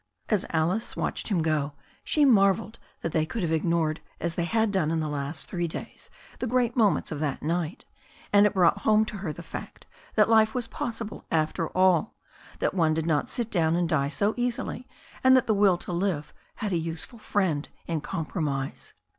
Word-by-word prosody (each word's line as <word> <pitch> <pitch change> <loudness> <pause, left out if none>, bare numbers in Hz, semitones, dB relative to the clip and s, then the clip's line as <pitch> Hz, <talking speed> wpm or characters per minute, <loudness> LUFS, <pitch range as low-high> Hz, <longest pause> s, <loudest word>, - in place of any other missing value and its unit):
As 210 -4 +1
Alice 175 +8 0
watched - - -2
him 180 -6 +1
go, 150 -2 0 0.3
she 300 -2 +3
marvelled 210 -2 +3 0.2
that 165 - -2
they 155 - +2
could 185 +6 -3
have 165 - 0
ignored 160 -1 +1 0.2
as 170 -1 -2
they 170 0 -1
bad 220 +2 +2
done 185 -6 +1
in 165 0 0
the 155 - -1
last 145 +1 -4
three 175 -2 -2
days 160 - -8 0.3
the 255 - -1
great 245 0 +1
moments 215 -8 +2
of 150 - -3
that 145 -3 -2
night, 165 +1 -2 0.5
and 205 0 +7
it 210 - -4
brought 185 +2 +4
home 215 +1 +4
to 215 - -6
her 190 -5 -3
the 170 - -9
fact - - -8 0.3
that 210 -1 +5
life 220 0 +4
was 245 -2 -1
possible 225 -2 -5
after 160 +1 0
all, 185 +1 +3 0.4
that - - 0
one 160 -4 +2
did 160 0 -1
not 155 -3 +1
sit 235 -2 -2
down 165 -3 +2
and 175 -1 +1
die 140 -4 +2
so 200 +9 0
easily, 245 0 -2 0.4
and 260 0 +7
that 255 - +2
the 220 - +2
will 200 -3 +4
to 175 - -7
live 170 -4 -1 0.2
had 210 -2 -3
a - - +2
useful 165 +7 -6
friend 185 -9 0 0.2
in 165 -3 -2
compromise. 150 -4 -3
175 Hz, 195 wpm, -27 LUFS, 160-215 Hz, 0.5 s, and